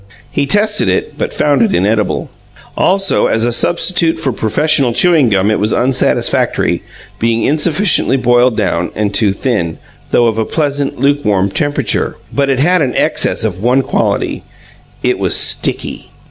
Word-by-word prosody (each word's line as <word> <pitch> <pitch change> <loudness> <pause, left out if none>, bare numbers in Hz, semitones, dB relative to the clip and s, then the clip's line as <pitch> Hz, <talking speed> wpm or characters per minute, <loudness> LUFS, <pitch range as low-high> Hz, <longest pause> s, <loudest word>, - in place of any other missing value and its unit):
He 140 - -1
tested 210 - +1
it, 95 - -2
but - - -2
found 145 -1 +1
it 220 -4 +2
inedible. 105 +1 -1 0.4
Also, 195 +1 +1
as 110 - 0
a 120 - 0
substitute 170 +4 +2
for 145 -5 -2
professional 125 +3 +1
chewing 160 -4 +3
gum 100 0 +1
it 110 - 0
was 105 +2 0
unsatisfactory, 130 +1 0 0.4
being 115 0 0
insufficiently 155 0 +1
boiled 120 -1 +2
down 90 -5 -1
and 105 -1 -2
too 105 -1 +2
thin, 100 -6 -2 0.3
though 120 - +2
of 115 -1 0
a - - +1
pleasant, 145 -2 -2
lukewarm 105 -9 +1
temperature. 145 +1 -1 0.2
But 140 -1 0
it 135 - +1
had 175 +6 +2
an 130 -4 -1
excess - - 0
of 95 -4 -3
one 125 +4 +2
quality - - -2 0.6
it - - 0
was - - +2
sticky. - - +1
130 Hz, 155 wpm, -13 LUFS, 110-150 Hz, 0.6 s, chewing